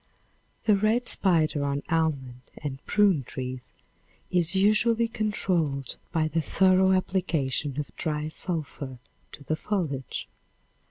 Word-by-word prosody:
The 210 -1 +5
red 220 +5 +1
spider 160 -9 +3
on 140 0 -1
almond 140 -7 -1 0.2
and 140 -2 -6
prune 200 -9 +3
trees 125 0 -6 0.6
is 180 0 +2
usually 220 +4 +3
controlled 175 - -1
by 160 -1 +1
the 165 +2 0
thorough 190 +4 +4
application 160 -7 0
of 150 - -5
dry 150 -1 -2
sulphur 150 -6 -5 0.3
to 145 - -11
the 155 - -1
foliage. 155 - -3
160 Hz, 115 wpm, -27 LUFS, 140-190 Hz, 0.6 s, The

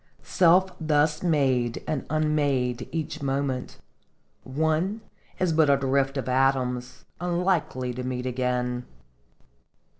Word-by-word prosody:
Self 185 +2 +4
thus 150 0 +2
made 135 -8 +1
and 150 -4 -2
unmade 145 -5 0
each 160 -3 -4
moment, 135 -2 -2 0.7
one 160 +9 0 0.4
is 180 -3 +1
but 155 -2 +4
a 140 - +5
drift 135 0 0
of 135 - -3
atoms, 130 -1 0 0.2
unlikely 175 -8 0
to 125 +1 -5
meet 125 0 -3
again 125 -1 -1
135 Hz, 110 wpm, -26 LUFS, 125-155 Hz, 0.7 s, a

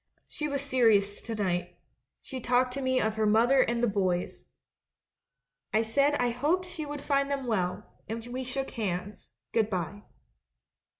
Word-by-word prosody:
She 300 - -4
was 280 -1 -2
serious 225 -7 +3
to 225 - -5
night; 180 -3 -1 0.4
she 265 - -6
talked 250 +1 +2
to 275 - -3
me 260 -1 +2
of 220 0 0
her 215 -1 +2
mother 235 +5 +5
and 235 -1 0
the - - +5
'boys.' 185 -4 -1 1.2
I 220 +1 +3
said 280 +6 +2
I 245 -3 +1
hoped 310 +10 +1
she 345 -4 -5
would 290 -1 -5
find 280 -1 +1
them 275 -2 -2
well; 185 -6 -1 0.3
and 225 +1 -4
we 250 +2 -4
shook 265 +1 -3
hands 200 -2 -4
— - - -59
'Good 220 -2 +2
bye.' 190 +1 -3
235 Hz, 170 wpm, -29 LUFS, 210-275 Hz, 1.2 s, mother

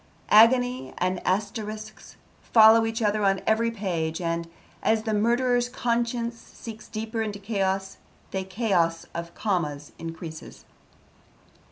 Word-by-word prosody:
Agony 245 +3 +5
and 185 0 -1
asterisks 215 +2 -3 0.3
follow 225 0 +6
each 225 0 -2
other 210 0 +1
on 195 -1 +3
every 225 +1 +2
page 175 -7 -2
and, 170 -1 -2 0.3
as 220 0 +2
the 220 -1 -1
murderer's 245 +3 +2
conscience 235 -1 -1
sinks 220 -1 -11
deeper 220 +1 -4
into 210 -2 -3
chaos, 195 -2 -2 0.3
the 190 -1 -2
chaos 185 -5 0
of 170 0 -6
commas 155 - -2
increases. 165 -1 -8
215 Hz, 120 wpm, -26 LUFS, 185-230 Hz, 0.3 s, follow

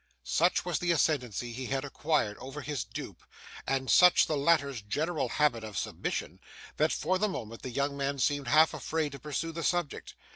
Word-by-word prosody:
Such 170 - +2
was 175 -5 -1
the 175 -1 +1
ascendancy 125 -7 0
he 130 +1 -5
had 135 +1 -2
acquired 140 -7 0
over 135 +3 -7
his 145 -8 -3
dupe, - - -8 0.5
and 135 -1 0
such 180 +5 +6
the 155 - -1
latter's 140 -4 +2
general 145 +5 -1
habit 120 -5 +1
of 110 -3 -7
submission, - - -3 0.4
that, 155 +1 +3
for 185 +4 0
the 210 +1 +1
moment, 115 - -6
the 130 - -5
young 140 +3 -1
man 140 0 -2
seemed 140 +1 0
half 155 +5 +5
afraid 160 -2 -2
to 140 - -9
pursue 150 +4 -3
the 165 +1 -5
subject. 175 -2 -2
140 Hz, 185 wpm, -30 LUFS, 130-160 Hz, 0.5 s, such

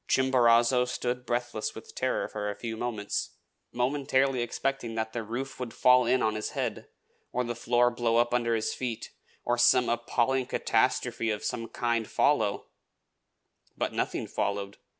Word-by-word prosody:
Chimborazo 125 -1 +4
stood 125 0 -3
breathless 120 -2 -2
with - - -11
terror - - -1
for 105 -1 -4
a 100 - -4
few 115 -2 -5
minutes, 110 -3 -3 0.4
momentarily 130 +1 +1
expecting 120 -1 -2
that 110 0 -2
the 115 - -2
roof 120 +6 -5
would 120 -3 -5
fall 125 -1 +5
in 130 +1 +3
on 110 - +2
his 110 0 -3
head, - - -2 0.4
or 125 - 0
the 120 0 -3
floor 120 +1 +2
blow 120 -1 +1
up 120 0 +2
under 115 -1 +2
his 110 -1 -1
feet, 120 -3 -4 0.3
or 120 0 +1
some 125 0 +5
appalling 120 +2 0
catastrophe 115 - +1
of 105 -1 -2
some 115 -1 -3
kind 115 -2 -1
follow; - - +2 1.1
but - - -1
nothing - - -2
followed. 100 0 -3
120 Hz, 155 wpm, -28 LUFS, 115-125 Hz, 1.1 s, fall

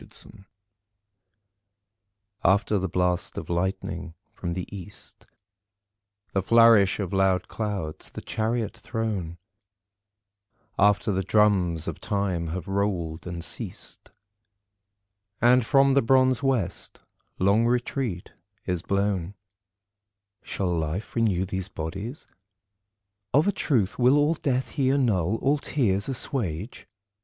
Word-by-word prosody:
The - - -9
End 95 - -17 2.0
After 100 +1 +3
the 95 0 -2
blast 90 0 0
of - - -5
lightning 90 -1 -2 0.2
from 85 -2 -4
the 90 0 -4
east, 100 +1 -10 1.1
The 95 - +2
flourish 115 -2 +5
of 100 -3 -3
loud 95 -1 +2
clouds, 100 -8 -4
the - - -8
Chariot 115 0 -2
throne, 105 -7 -3 1.4
After 105 +1 +3
the 95 -1 0
drums 95 -5 +2
of - - -5
time 100 -5 -1
have 90 +4 -5
rolled 95 -5 -2
and 85 -1 -5
ceased - - -7 1.3
And 125 +1 +5
from 135 +2 +4
the 140 - +4
bronze 130 +1 +3
west 130 -9 -1 0.4
long 100 +5 +3
retreat 120 -5 -2 0.3
is 90 -2 -1
blown, 100 -1 -1 1.1
Shall 90 -3 -2
Life 80 +5 -3
renew 100 -6 +2
these 95 0 -4
bodies? 95 - -6 1.1
Of 150 +6 +4
a - - +4
truth 120 - 0
All 145 +5 +4
death 130 -5 -1
will - - +2
he 130 - +3
annul, 110 -9 +2
all 140 +5 +1
tears 105 -8 0
assuage? 115 - -3
100 Hz, 115 wpm, -26 LUFS, 90-120 Hz, 2.0 s, flourish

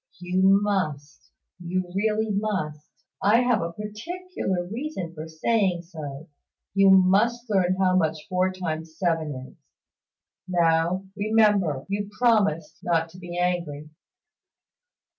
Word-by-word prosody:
"You 185 +2 +3
must 155 -8 -2 0.3
you 180 +1 -2
really 215 +2 0
must 190 -8 -2 0.3
I 215 +4 +5
have 245 -2 +2
a 165 0 -3
particular 210 - -4
reason 215 - -5
for 155 0 -7
saying 180 +2 0
so 155 -3 -8 0.5
you 195 0 +5
must 200 +6 +4
learn 185 -2 +2
how 185 -1 +3
much 160 -3 0
four 185 0 +1
times 160 -3 -5
seven 165 -5 0 0.2
is. - - -25 0.9
Now, 170 +1 +2
remember, 205 -9 +2
you 200 +1 -3
promised 205 -10 +2
not 165 -1 0
to 180 +2 -14
be 175 -1 -7
angry." 170 -4 -2
185 Hz, 120 wpm, -25 LUFS, 165-205 Hz, 0.9 s, I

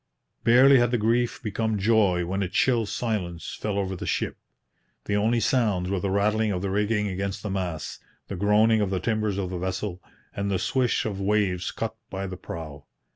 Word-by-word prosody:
Barely 130 +3 +7
had 120 -1 +3
the 120 - +1
grief 120 +3 0
become 110 0 -1
joy, 100 -4 +3
when 95 +3 -2
a 95 - 0
chill 115 +2 +2
silence 95 -8 -3
fell 105 -2 -3
over 95 -1 -1
the - - -6
ship. - - -1 0.7
The 100 - 0
only 110 +3 +2
sounds 105 -6 +1
were 100 - 0
the 95 - -2
rattling 105 +2 +1
of 90 -1 -2
the 100 - -1
rigging 105 +1 +1
against 100 0 -3
the 105 - -3
masts, 90 -6 -3 0.3
the 100 - -5
groaning 105 +3 +3
of 100 - +1
the 95 -1 -1
timbers 110 0 -1
of 95 -2 -2
the 90 - -3
vessel, 95 0 -3 0.3
and 100 0 -2
the 95 - +1
swish 125 +6 0
of 105 -3 -2
the 100 - -4
waves 95 -3 +1
cut 115 0 -4
by 95 0 -4
the 95 -1 -5
prow. 80 -5 -8
100 Hz, 200 wpm, -26 LUFS, 95-110 Hz, 0.7 s, Barely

